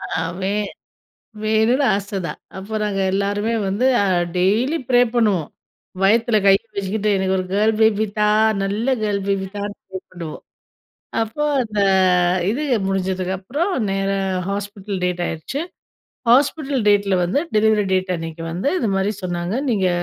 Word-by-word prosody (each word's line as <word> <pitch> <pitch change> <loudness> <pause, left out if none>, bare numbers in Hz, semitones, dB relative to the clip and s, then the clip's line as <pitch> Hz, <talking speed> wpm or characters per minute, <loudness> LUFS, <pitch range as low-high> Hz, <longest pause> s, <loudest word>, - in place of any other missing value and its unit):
ஆ 160 - -3 0.2
வே 195 +1 0 0.9
வேணுனு 220 +5 +2
ஆச 200 0 -4 0.2
தான், - - -7 0.2
அப்புறம் 215 +3 -4
நாங்க 195 -2 -1
எல்லோருமே 205 +3 0
வந்து 205 +6 0 0.2
அ - - +1 0.3
டெய்லி 225 - +2
ப்ரே 245 -1 +5
பண்ணுவோம், 210 -9 +1 0.5
வயித்தில 225 +3 +3
கைய 195 0 +6 0.2
வச்சிக்கிட்டு, 200 +2 -1
எனக்கு 190 0 0
ஒரு 185 - -2
கேர்ல் 215 +2 +3
பேபி 220 0 +4
தா! 210 0 +4 0.3
நல்ல 205 +4 -2 0.2
கேர்ல் 200 -2 0
பேபி 195 -1 0
தான்னு 205 0 -4 0.2
கூப்புடுவோம். 175 -4 -8 0.8
அப்போ 225 +7 -4 0.2
அந்த 215 -3 -3 0.7
இது 265 +8 -2 0.3
முடிஞ்சதுக்கு 190 -1 -1
அப்புறம், 305 - -2 0.2
நேரா 195 0 0 0.3
ஹாஸ்பிட்டல் 200 -1 -4
டேட் 180 -1 -1
ஆயிருச்சு, 165 - -4 0.7
ஹாஸ்பிட்டல் 275 0 +2
டேட்ல 200 -2 +3
வந்து 180 +10 0 0.2
டெலிவரி 215 -1 +3
டேட் 185 0 +1
அன்னக்கி 165 0 -6
வந்து 185 +11 -1
இதுமாரி 195 - 0
சொன்னாங்க, 175 +2 -3 0.2
நீங்க 195 -4 +2
200 Hz, 135 wpm, -20 LUFS, 190-220 Hz, 0.9 s, கைய